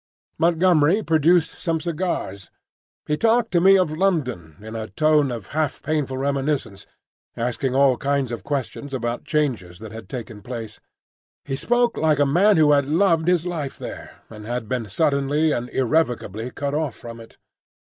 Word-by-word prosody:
Montgomery 170 +2 +3
produced 165 +1 +3
some 165 -2 -2
cigars. 155 - -3 0.6
He 150 - -1
talked 230 +4 +2
to 175 -1 +3
me 195 +2 +7
of 170 -5 0
London 130 - -1
in 110 +2 -9
a 110 -1 -4
tone 155 -1 +2
of 115 -5 -7
half 155 -2 -2
painful 150 -4 -1
reminiscence, 135 -6 -2 0.5
asking 125 +2 -2
all 135 -2 +4
kinds 140 -2 -1
of 120 - -5
questions 140 0 -4
about 120 -1 -3
changes 125 - -1
that 110 +2 -10
had 110 0 -10
taken 115 -5 -7
place. 115 -1 -7 0.7
He 135 - -3
spoke 240 - +1
like 155 -2 +2
a 145 - +3
man 180 +8 +4
who 155 -2 +5
had 140 -2 +3
loved 165 0 +2
his 180 -2 +2
life 160 -6 -4
there, - - -9
and 105 -1 -11
had 120 -2 -3
been 125 -2 -2
suddenly 145 +5 +1
and 120 -2 -2
irrevocably 125 - -1
cut 140 +2 -4
off 150 -3 -1
from 115 -1 -10
it. 115 - -14
140 Hz, 165 wpm, -22 LUFS, 120-160 Hz, 0.7 s, me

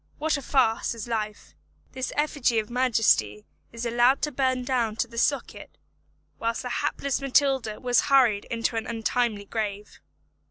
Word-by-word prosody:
What 315 0 0
a 280 - -4
farce 240 -4 +1
is 230 0 -7
life. 215 -2 -4 0.4
This 260 -1 -4
effigy 285 -5 +1
of 215 +1 -1
majesty 220 - +2 0.3
is 230 +1 -6
allowed 240 +3 +3
to 300 - 0
burn 260 -1 0
down 245 -4 0
to 240 - -1
the 230 0 -5
socket, 280 +2 -2 0.6
whilst 230 +2 -2
the 250 - -4
hapless 280 +1 -2
Matilda 265 -5 +1
was 245 -1 +2
hurried 245 -7 +4
into 230 -1 -2
an 225 - -3
untimely 225 -2 -1
grave. 210 -1 -5
240 Hz, 155 wpm, -26 LUFS, 225-260 Hz, 0.6 s, hurried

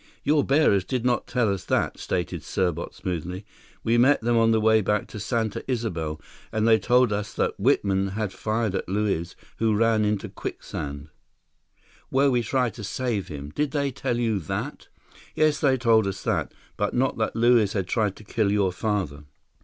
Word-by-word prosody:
"Your 145 0 +3
bearers 135 - +3
did 125 +5 -3
not 125 -1 +1
tell 120 -5 +1
us 95 - -5
that," - - 0
stated 90 -3 -2
Serbot 85 -3 -2
smoothly. 90 +2 -4 0.4
"We 115 +1 +3
met 135 +4 +5
them 120 +1 +1
on 115 0 +4
their 110 -1 +3
way 110 0 +4
back 105 +1 0
to 105 - -7
Santa 110 0 -2
Isabel, 85 -11 -2 0.3
and 110 0 +1
they 110 -1 +6
told 125 +1 +3
us 105 -1 -4
that - - -1
Whitman 95 -1 +2
had 100 0 -3
fired 110 -2 -1
at 95 - -3
Luiz, 95 -4 -1 0.2
who 110 -1 +2
ran 115 0 +3
into 105 -1 0
quicksand—" 70 +1 -6 1.0
"Where 135 +1 +3
we 125 -1 +2
tried 125 +1 0
to 110 - -9
save 105 -2 -2
him. 75 -3 -7
Did 150 - -1
they 140 0 -1
tell 125 -1 -2
you 115 -4 0
that?" 80 - -5 0.5
"Yes, 155 -1 +2
they 135 -4 +3
told 115 -4 +3
us 95 -1 -4
that. - - -1 0.3
But 105 - -1
not 130 -1 +1
that 110 - -1
Luiz 115 -3 +4
had 95 -3 -1
tried 105 +1 0
to - - -13
kill 105 0 0
your 100 -3 +2
father." 90 -8 -2
110 Hz, 185 wpm, -25 LUFS, 95-120 Hz, 1.0 s, they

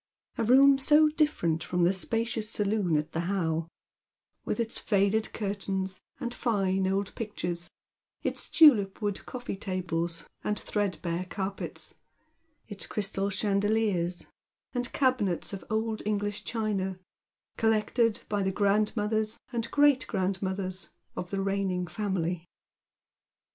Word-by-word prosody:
A - - +2
room 270 +4 +6
so 300 +3 +6
different 295 - +1
from 180 -1 0
the 175 +2 +4
spacious 225 +2 0
saloon 205 -6 +1
at 150 +1 -2
the 160 - -2
How, 165 -4 0 0.8
with - - -2
its 230 -1 0
faded 205 +1 +1
curtains 195 -2 -2 0.2
and 240 0 -3
fine 195 -6 +1
old 195 +1 -1
pictures, 175 -6 -4 0.5
its - - -2
tulipwood 205 -9 +5
coffee 245 -4 -5
tables 175 -4 -2 0.2
and 210 0 0
threadbare 185 -4 -2
carpets, 195 0 -4 0.7
its 205 -3 -5
crystal 200 -1 -1
chandeliers, 200 -3 +1 0.5
and 245 -1 -2
cabinets 240 - +1
of 195 - -5
old 220 0 -1
English 205 0 -2
china, 205 -5 -1 0.6
collected 225 0 +2
by 205 -1 0
the 190 0 +1
grandmothers 215 +2 +1
and 230 -1 -2
great 290 -2 +4
grandmothers 190 0 -2 0.3
of 180 - -4
the 195 0 -1
reigning 195 -2 0
family. 175 -2 -2
200 Hz, 115 wpm, -29 LUFS, 185-220 Hz, 0.8 s, room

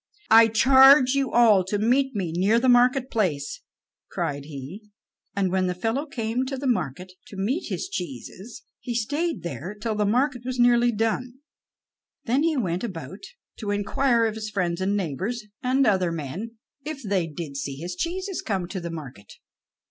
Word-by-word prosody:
"I 225 0 +8
charge 265 +3 +6
you 275 -1 0
all 220 -5 +5
to 205 +3 -1
meet 255 +5 +1
me 180 -5 -2
near 200 +6 +3
the 260 - 0
marketplace"; 245 - +2 0.6
and 175 +7 -5
when 185 0 +1
the 180 - -2
fellow 230 - -2
came 235 -2 -2
to 270 0 -4
the 275 - -6
market 185 - -2 0.2
to 200 - -11
meet 250 - -2
his - - -3
cheeses, 180 - -7 0.2
he 240 - -5
stayed 295 +9 -1
there 180 +4 -6
till 225 0 -2
the 210 -1 0
market 250 +3 +1
was 255 0 -4
nearly 240 0 +4
done. 225 +3 -2 0.9
Then 250 +4 +1
he 320 -1 +1
went 180 -6 -1
about 185 - -6 0.4
to 210 - -5
inquire 230 +4 +1
of 220 - -1
his 215 0 -5
friends 180 -4 -2
and 200 +2 +1
neighbors, 195 - -3 0.2
and 260 +2 +2
other 185 -5 +2
men, 165 - -6 0.3
if 295 -2 -6
they 195 -5 0
did 150 -2 -7
see 140 0 -4
his 175 +6 -6
cheeses 370 - -3
come 190 -4 -2
to 190 - -4
the 170 - -5
market. 130 -11 -9
215 Hz, 165 wpm, -25 LUFS, 180-250 Hz, 0.9 s, I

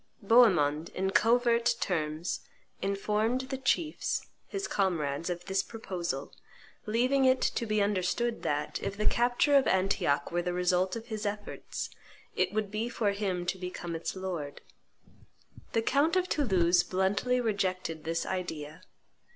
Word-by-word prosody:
Bohemond, 175 -9 +4
in 190 +1 0
covert 235 +1 +3
terms, 155 -1 -1 0.4
informed 210 +5 0
the 265 0 -5
chiefs, 310 +4 0 0.2
his 395 0 -3
comrades, 165 -5 0
of 175 0 -4
this 195 0 +1
proposal, 175 - -5 0.5
leaving 250 +5 +2
it 260 0 +5
to 235 - -1
be 215 -1 +2
understood 205 +4 0
that, 145 0 -2
if 200 - -4
the 210 - -1
capture 245 +4 +3
of 275 -2 +5
Antioch 185 -7 +1
were 175 +1 +1
the 180 0 -2
result 180 +2 +1
of 230 +1 -7
his 215 -1 -4
efforts, 205 0 -4 0.4
it - - +1
would 210 -2 -2
be 220 +3 -2
for 220 -4 0
him 195 -3 -2
to 185 +1 -2
become 180 -2 -5
its 165 - -4
lord. 175 -7 -5 1.1
The 225 - +2
count 285 +8 +2
of 370 0 +2
Toulouse 185 - +3
bluntly 195 +7 +1
rejected 185 -8 -1
this 165 +1 -1
idea. 160 -3 -4
195 Hz, 145 wpm, -30 LUFS, 175-235 Hz, 1.1 s, it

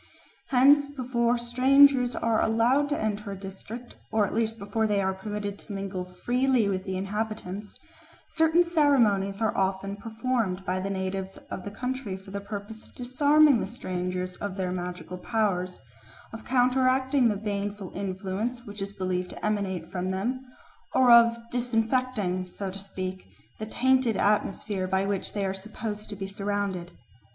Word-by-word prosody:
Hence 280 +3 +5
before 245 -3 0
strangers 255 +1 +5
are 230 -1 +1
allowed 245 +6 +3
to 295 - 0
enter 210 -1 -2
a 195 - -8
district, 200 +5 -9
or 220 -2 +3
at - - -5
least 225 0 0
before 220 +2 -1
they 205 -1 +1
are 190 -1 +1
permitted 205 +1 -5
to 210 - -9
mingle 195 -2 -4
freely 245 +5 +1
with 190 -1 -1
the 190 -1 -2
inhabitants, 205 0 -4 0.5
certain 325 +1 +4
ceremonies 235 - +3
are 220 - +1
often 195 +1 0
performed 220 -3 -2
by 185 +1 0
the 195 +1 -3
natives 190 0 -3
of 185 - -5
the 205 - -5
country 250 -2 -4
for 190 0 -13
the 200 0 -4
purpose 205 +2 -7
of - - -21
disarming 285 +2 +4
the - - -2
strangers 180 -4 -3
of 205 -2 -4
their 185 -2 -2
magical 180 0 -5
powers, 185 -4 0 0.6
of 225 - -8
counteracting 260 +1 +3
the 210 - 0
baneful 200 -1 -3
influence 200 +5 -3
which 205 0 -8
is 195 0 -3
believed 185 -2 -2
to - - -7
emanate 190 -5 -1
from 185 0 -2
them, 235 +8 -2 0.5
or 255 -2 +6
of 235 0 +7
disinfecting, 225 -5 0
so 190 +1 -5
to 195 - -7
speak, 185 - -6 0.3
the 215 - -4
tainted 255 -2 +2
atmosphere 200 -1 0
by 190 +1 +1
which 200 -1 -2
they 200 -2 -1
are 190 - -1
supposed 210 +2 -6
to 205 - -4
be 195 0 -5
surrounded. 195 -2 -2
205 Hz, 160 wpm, -27 LUFS, 190-245 Hz, 0.6 s, of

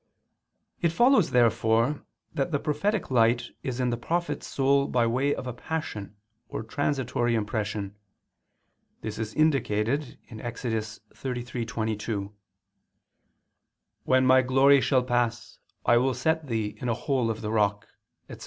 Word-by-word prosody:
It 170 - +3
follows 240 - +4
therefore 115 +3 +2 0.3
that 135 +2 -1
the 145 - +2
prophetic 155 +7 -1
light 120 0 +3
is 130 -1 -4
in 125 -1 +1
the 120 - -1
prophet's 165 +3 -2
soul 140 +1 +2
by 120 -2 +2
way 130 +5 +1
of - - -6
a 125 - -4
passion 120 -8 -5 0.3
or - - -4
transitory 120 -1 -1
impression. 105 -2 -2 1.1
This 110 0 -5
is 110 -1 -4
indicated 135 -3 +1
Ex. 120 +2 -7
33:22: 110 -2 -4 1.7
"When 130 0 +3
my 130 0 +6
glory 135 +2 +5
shall 130 -2 +2
pass, 120 -1 -1 0.3
I 120 - +5
will 130 +1 +2
set 160 -1 0
thee 110 -3 -2
in 125 - -2
a 115 - +1
hole 125 -1 0
of 110 0 -3
the 105 - -3
rock," 105 -3 +1 0.4
etc. - - -10
120 Hz, 135 wpm, -27 LUFS, 110-140 Hz, 1.7 s, my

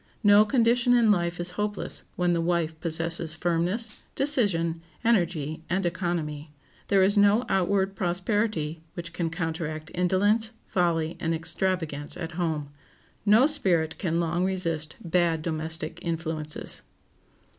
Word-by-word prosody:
No 205 +1 +7
condition 240 +1 +3
in 230 -3 +5
life 175 -3 0
is 175 +1 -3
hopeless 210 -1 -3
when 180 -1 +1
the 170 - +1
wife 165 -2 -1
possesses 165 0 +1
firmness, 175 +7 -1 0.2
decision, 190 - +2 0.2
energy, 170 -9 0
and 185 +2 0
economy. 165 -4 -3 0.4
There 195 -1 +4
is 200 +2 +3
no 205 +4 +4
outward 195 0 +1
prosperity 180 -3 -1
which 170 -1 -6
can 165 -1 -2
counteract 160 -2 -4
indolence, 205 +6 +1
folly, 170 -3 0
and 165 0 -1
extravagance 160 -3 -1
at 165 0 -5
home. 160 -4 -2 0.6
No 220 +6 +6
spirit 185 - +1
can 170 -3 0
long 170 +1 0
resist 170 -5 0
bad 170 -2 +1
domestic 160 0 -3
influences. 160 -2 -1
175 Hz, 125 wpm, -26 LUFS, 160-195 Hz, 0.6 s, No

